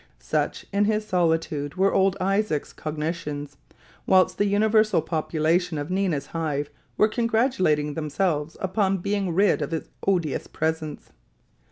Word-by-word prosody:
Such - - -2
in 205 +1 +3
his 215 0 0
solitude 165 -6 0
were 195 +1 +2
old 195 0 +3
Isaac's 195 -5 0
cogitations, 150 -2 -4 0.5
whilst 185 -1 +4
the 205 - +3
universal 215 0 +3
population 160 +1 0
of 145 +4 -4
Nina's 185 -7 0
Hive 150 -3 -3 0.3
were 215 - +5
congratulating 220 - +1
themselves 155 0 -1
upon 195 0 +1
being 195 0 -1
rid 195 0 +3
of 145 - -2
his 160 0 -4 0.2
odious 175 -7 0
presence. 160 -1 -3
170 Hz, 130 wpm, -25 LUFS, 155-195 Hz, 0.5 s, were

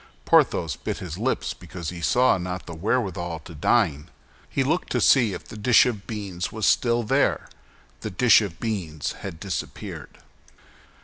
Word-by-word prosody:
Porthos 80 -4 +3
bit - - -4
his - - -7
lips - - -1
because 85 -3 -7
he 85 -1 -8
saw 125 +2 +3
not 90 0 -5
the - - -8
wherewithal 90 -2 -1
to 85 - -11
dine. 80 -3 +1 0.4
He 135 - 0
looked 160 +7 -1
to - - +2
see 120 -7 +4
if - - -6
the - - -10
dish 110 +2 +5
of 110 -6 -3
beans 100 -5 -4
was 110 -2 -2
still 120 -1 +3
there; 105 - +1 0.5
the 110 - -5
dish 115 +4 +5
of 95 -6 -5
beans 90 -10 -3
had 80 - -7
disappeared. 95 -2 -6
100 Hz, 165 wpm, -24 LUFS, 85-115 Hz, 0.5 s, dish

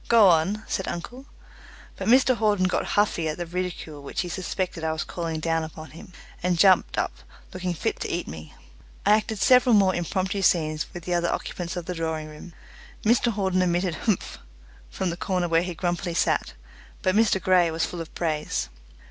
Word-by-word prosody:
"Go 225 -4 +7
on," 180 +6 +2
said 190 - -2
uncle. 245 +10 -6 0.7
But 190 - -5
Mr 255 +2 +5
Hawden 210 -4 +2
got 185 - 0
huffy 195 -6 +2
at 155 - -4
the 175 - -3
ridicule 170 -4 -5
which 140 - -3
he 180 - -5
suspected 180 0 -3
I 160 0 0
was 160 - -2
calling 165 -2 -4
down 165 0 0
upon 160 0 -9
him, 165 - -12 0.3
and 180 0 +1
jumped 190 +1 +4
up - - 0 0.4
looking 180 -1 -3
fit - - -2
to - - -3
eat - - -2
me. 80 +1 -9 0.5
I 205 - +5
acted 215 +1 +2
several 250 +3 +5
more 195 -2 +4
impromptu 185 +3 -2
scenes 155 -4 +1
with 175 - -8
the 180 - -2
other 170 0 +1
occupants 175 -1 -4
of 175 -2 -4
the 180 - -3
drawing 160 -2 -3
room. 155 +3 -11 0.5
Mr 235 +1 +3
Hawden 190 -3 0
emitted 175 0 +1
"Humph!" 205 +3 -2 0.5
from 185 -2 -2
the 170 - -5
corner 180 -1 -1
where 165 0 +3
he 180 -1 -4
grumpily 175 -1 -2
sat, - - 0 0.5
but 185 - +2
Mr 215 -2 +3
Grey 185 -2 +4
was 160 0 0
full 175 - -6
of 165 - -8
praise. 155 - -2
180 Hz, 190 wpm, -25 LUFS, 165-190 Hz, 0.7 s, Go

